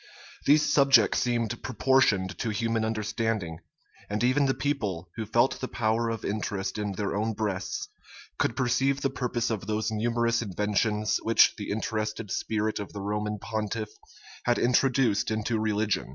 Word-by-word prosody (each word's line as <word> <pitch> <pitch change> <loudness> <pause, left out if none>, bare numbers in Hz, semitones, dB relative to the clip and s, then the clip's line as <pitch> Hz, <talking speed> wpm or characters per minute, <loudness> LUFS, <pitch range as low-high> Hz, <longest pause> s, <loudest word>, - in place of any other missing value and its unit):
These 150 +2 +6
subjects 135 -8 +5
seemed 120 -2 -1
proportioned 115 -6 +2
to 115 - -1
human 115 +1 0
understanding; 110 -5 -2 0.5
and 105 +3 -1
even 135 +3 +3
the 135 - +1
people, 100 - -2
who 110 -2 -4
felt 120 +4 +2
the 130 - -2
power 115 0 0
of 115 -1 -4
interest 100 -1 -2
in 105 -2 -2
their 100 +1 -2
own 110 +2 0
breasts, 100 -3 -3 0.5
could 115 - +1
perceive 135 +2 +1
the 135 - 0
purpose 120 -2 -1
of 105 -3 -3
those 110 0 -1
numerous 115 +1 +1
inventions 105 +1 0
which 115 +1 +5
the 105 - -6
interested 110 0 -3
spirit 110 0 -1
of 105 - -7
the 100 - -6
Roman 105 +1 -2
pontiff 110 +1 -3 0.5
had 120 -1 +3
introduced 125 -2 +2
into 110 +1 -1
religion. 110 -4 0
110 Hz, 150 wpm, -27 LUFS, 105-120 Hz, 0.5 s, These